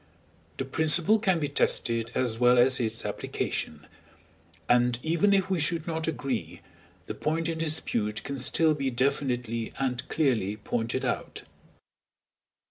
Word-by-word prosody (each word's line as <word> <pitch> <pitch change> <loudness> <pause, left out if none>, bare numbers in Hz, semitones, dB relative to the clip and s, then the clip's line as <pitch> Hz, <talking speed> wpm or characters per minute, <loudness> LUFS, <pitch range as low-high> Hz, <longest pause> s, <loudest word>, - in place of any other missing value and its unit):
The 135 - -3
principle 160 +9 +4
can 190 -6 +1
be 150 - -1
tested 115 -5 0
as 115 -3 0
well 125 0 +5
as 125 +1 +4
its 115 -1 -2
application; 75 -1 -3 0.8
and 120 0 +3
even 170 +6 +2
if 195 -2 +3
we 190 -2 0
should 160 +1 0
not 160 -1 -3
agree, 130 - -3 0.4
the - - -5
point 160 +2 -2
in 165 -1 -3
dispute 115 -9 -1
can 140 -1 -5
still 155 +5 +3
be 140 -3 -2
definitely 125 -3 -1
and 130 0 -2
clearly 115 -9 0
pointed 115 +2 -2
out. - - -3
135 Hz, 135 wpm, -27 LUFS, 115-160 Hz, 0.8 s, well